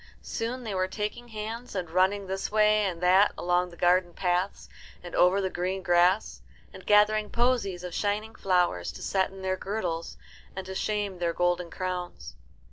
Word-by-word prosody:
Soon 245 Hz, +3 st, -4 dB
they 215 Hz, -3 st, -4 dB
were 185 Hz, 0 st, 0 dB
taking 210 Hz, +5 st, -4 dB
hands, 225 Hz, +1 st, -6 dB
and 180 Hz, -2 st, -2 dB
running 190 Hz, +3 st, +2 dB
this 190 Hz, +1 st, -3 dB
way 215 Hz, 0 st, +4 dB
and 175 Hz, -3 st, -3 dB
that 190 Hz, +3 st, +5 dB
along 180 Hz, 0 st, +1 dB
the 170 Hz, -, -15 dB
garden 175 Hz, 0 st, +2 dB
paths 180 Hz, +1 st, -1 dB, 0.4 s
and 175 Hz, -, -9 dB
over 180 Hz, +2 st, +4 dB
the 190 Hz, -1 st, 0 dB
green 185 Hz, +2 st, -2 dB
grass, 175 Hz, +4 st, +2 dB, 0.3 s
and -, -, -12 dB
gathering 210 Hz, 0 st, +4 dB
posies 235 Hz, -7 st, 0 dB
of 180 Hz, -1 st, -6 dB
shining 210 Hz, +3 st, -1 dB
flowers 180 Hz, -, +1 dB
to -, -, -9 dB
set 190 Hz, -1 st, +1 dB
in 190 Hz, 0 st, -11 dB
their 185 Hz, 0 st, 0 dB
girdles 180 Hz, -5 st, -4 dB, 0.4 s
and 190 Hz, 0 st, -5 dB
to 190 Hz, -, -6 dB
shame 205 Hz, -1 st, -2 dB
their 170 Hz, -1 st, 0 dB
golden 175 Hz, 0 st, 0 dB
crowns. 180 Hz, 0 st, -5 dB
190 Hz, 175 wpm, -28 LUFS, 180-210 Hz, 0.4 s, that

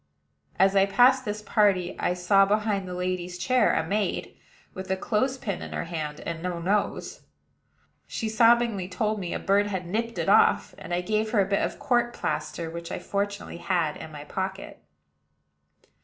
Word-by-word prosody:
As 195 Hz, +1 st, +4 dB
I 195 Hz, 0 st, +5 dB
passed 250 Hz, +6 st, +4 dB
this 210 Hz, 0 st, -4 dB
party, 195 Hz, -4 st, +2 dB
I 180 Hz, -, 0 dB
saw 195 Hz, +2 st, +4 dB
behind 205 Hz, -1 st, 0 dB
the 180 Hz, -, -5 dB
lady's 180 Hz, 0 st, -3 dB
chair 250 Hz, +4 st, +3 dB
a -, -, 0 dB
maid, 205 Hz, +1 st, -2 dB, 0.4 s
with 190 Hz, 0 st, -7 dB
a 190 Hz, -, 0 dB
clothes 255 Hz, +7 st, 0 dB
pin 200 Hz, -7 st, -4 dB
in -, -, -7 dB
her -, -, -2 dB
hand, 155 Hz, -3 st, -5 dB
and 165 Hz, -1 st, -5 dB
no 180 Hz, 0 st, -3 dB
nose. 195 Hz, +5 st, -1 dB, 0.9 s
She 225 Hz, -, -3 dB
sobbingly 225 Hz, -3 st, +3 dB
told 215 Hz, +2 st, -1 dB
me 180 Hz, -3 st, -4 dB
a -, -, -1 dB
bird 200 Hz, +1 st, +2 dB
had 190 Hz, -3 st, -3 dB
nipped 230 Hz, +6 st, -3 dB
it -, -, -2 dB
off; -, -, +4 dB
and -, -, -9 dB
I 175 Hz, 0 st, +1 dB
gave 215 Hz, +3 st, 0 dB
her 210 Hz, -, +4 dB
a -, -, +2 dB
bit 200 Hz, 0 st, +1 dB
of -, -, -2 dB
court 240 Hz, -1 st, +1 dB
plaster, 170 Hz, -, -3 dB
which 170 Hz, +1 st, -7 dB
I -, -, -3 dB
fortunately 200 Hz, -2 st, -3 dB
had 170 Hz, -4 st, 0 dB
in 160 Hz, -, -9 dB
my 145 Hz, -1 st, -8 dB
pocket. 190 Hz, +5 st, -5 dB
195 Hz, 185 wpm, -26 LUFS, 180-215 Hz, 0.9 s, I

